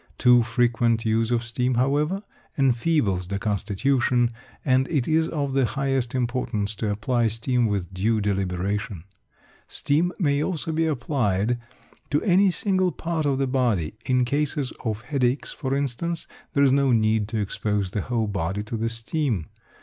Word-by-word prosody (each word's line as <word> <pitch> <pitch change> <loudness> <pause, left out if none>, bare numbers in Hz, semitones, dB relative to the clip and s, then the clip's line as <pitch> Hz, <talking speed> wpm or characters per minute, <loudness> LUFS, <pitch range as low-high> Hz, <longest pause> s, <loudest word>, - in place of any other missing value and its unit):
Too 125 -1 +6
frequent 120 -1 +1
use 110 +1 +1
of 120 -1 +1
steam, 125 +2 -1
however, 150 - +1 0.3
enfeebles 120 - +2
the 100 +1 -2
constitution, 120 +4 +1 0.3
and 130 0 +3
it 140 -7 0
is 160 0 +2
of 140 -5 -2
the 135 -1 +3
highest 135 -1 -1
importance 120 -4 -1
to 110 - -1
apply 115 +3 +1
steam 115 +2 0
with 95 -3 -2
due 110 +4 +1
deliberation. 100 -1 -2 0.6
Steam 160 +5 +1
may 145 -6 +1
also 165 -2 -2
be 160 +1 +1
applied 120 -6 0 0.5
to 145 - +2
any 195 0 +4
single 185 0 +1
part 165 -3 -2
of 135 -2 +1
the 135 - +1
body; 120 - 0
in 125 -1 +3
cases 145 +1 -1
of 110 -3 -2
headache, 130 -2 0
for 135 -2 -3
instance, 145 +5 -2 0.3
there 140 - +3
is 135 - +5
no 135 -1 +3
need 110 -2 +2
to 115 - -3
expose 105 -1 -1
the 100 - -1
whole 115 +1 -1
body 100 0 -2
to 110 +2 -5
the 115 +1 -1
steam. 115 - -2
120 Hz, 155 wpm, -24 LUFS, 110-140 Hz, 0.6 s, Too